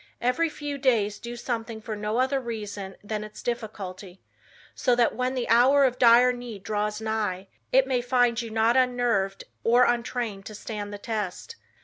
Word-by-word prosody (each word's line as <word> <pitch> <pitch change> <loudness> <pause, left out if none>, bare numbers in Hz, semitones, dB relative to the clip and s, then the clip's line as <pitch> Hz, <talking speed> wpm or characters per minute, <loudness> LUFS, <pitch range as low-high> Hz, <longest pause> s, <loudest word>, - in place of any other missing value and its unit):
"Every 250 +7 +1
few 290 -2 -5
days 220 -6 +1
do 240 0 -7
something 230 -2 -4
for 220 0 -5
no 210 +2 -2
other 265 +2 +2
reason 210 -5 -6
than 210 0 -3
its 215 0 -10
difficulty, 200 -5 -5 0.5
so 250 -2 +2
that 240 -1 +3
when 255 +1 -1
the 250 -2 -2
hour 260 +5 +5
of 250 -1 0
dire 245 +1 +6
need 240 -5 -8
draws 210 0 -2
nigh, 210 -4 -2 0.2
it 265 +1 +5
may 255 -2 0
find 245 -1 +2
you 230 - -6
not 225 +2 +2
unnerved 245 -6 +1 0.2
or 240 +2 +5
untrained 235 -4 -2
to 215 - -8
stand 205 -1 -6
the 205 - -6
test. 215 - -4
230 Hz, 170 wpm, -26 LUFS, 210-250 Hz, 0.5 s, dire